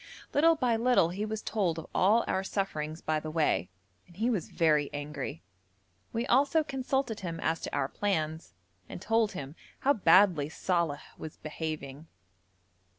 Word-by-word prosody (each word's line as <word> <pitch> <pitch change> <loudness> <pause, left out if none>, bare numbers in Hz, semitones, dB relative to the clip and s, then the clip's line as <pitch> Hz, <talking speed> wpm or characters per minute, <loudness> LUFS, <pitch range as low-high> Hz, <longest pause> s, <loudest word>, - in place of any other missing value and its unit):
Little 330 +3 +5
by 245 -6 +1
little 235 -7 +3
he 195 +4 -3
was 215 0 -4
told 190 -7 0
of 165 - -6
all 215 +5 +4
our 190 - -1
sufferings 160 -6 -3
by 155 0 0
the 155 - -6
way, 150 - +1 0.4
and 220 +8 -1
was 200 -8 -2
very 150 -3 +2
angry. 145 0 -5 0.7
We 230 +1 -1
also 285 +6 +3
consulted 265 -4 -2
him 170 -3 -5
as 160 0 0
to - - -5
our 140 -2 +1
plans, 160 -4 -2 0.3
and - - -7
told 225 -2 +1
him 145 -3 -7 0.3
how 280 - +4
badly 185 - +4
Saleh 170 -3 -1 0.2
was 155 - -8
behaving. 155 -1 -6
175 Hz, 150 wpm, -30 LUFS, 155-225 Hz, 0.7 s, Little